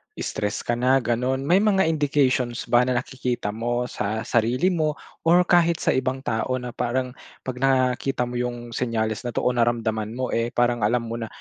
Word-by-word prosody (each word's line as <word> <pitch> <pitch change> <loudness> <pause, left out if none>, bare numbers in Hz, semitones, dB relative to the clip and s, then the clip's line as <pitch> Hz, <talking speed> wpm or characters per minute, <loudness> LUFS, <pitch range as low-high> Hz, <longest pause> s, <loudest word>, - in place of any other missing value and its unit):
Stress 105 +1 -3
ka - - -1
na 130 +1 +3
ganun? 125 +3 0
May 180 +7 +4
mga 200 -2 +3
indications 140 -6 +1
ba 120 +1 +5
na 125 - +1
nakikita 125 -4 -2
mo 120 +3 -1
sa 110 +2 -2
sarili 120 +12 +1
mo? 155 -3 0 0.3
Or 175 +2 +6
kahit 170 -1 +3
sa - - +3
ibang 130 +1 -1
tao 115 +2 -1
na 125 -1 -5
parang 125 +2 -2 0.3
pag 125 -1 -5
nakita 130 -1 +1
mo 120 0 -4
yung 120 -1 -4
senyales 115 -1 -2
na 120 - -5
to - - 0
o 125 - +3
naramdaman 115 -2 0
mo, 130 0 -2
eh, 115 0 0
parang 120 0 +2
alam 115 +3 +1
mo 115 - -3
na 115 - -4
125 Hz, 190 wpm, -24 LUFS, 120-130 Hz, 0.3 s, Or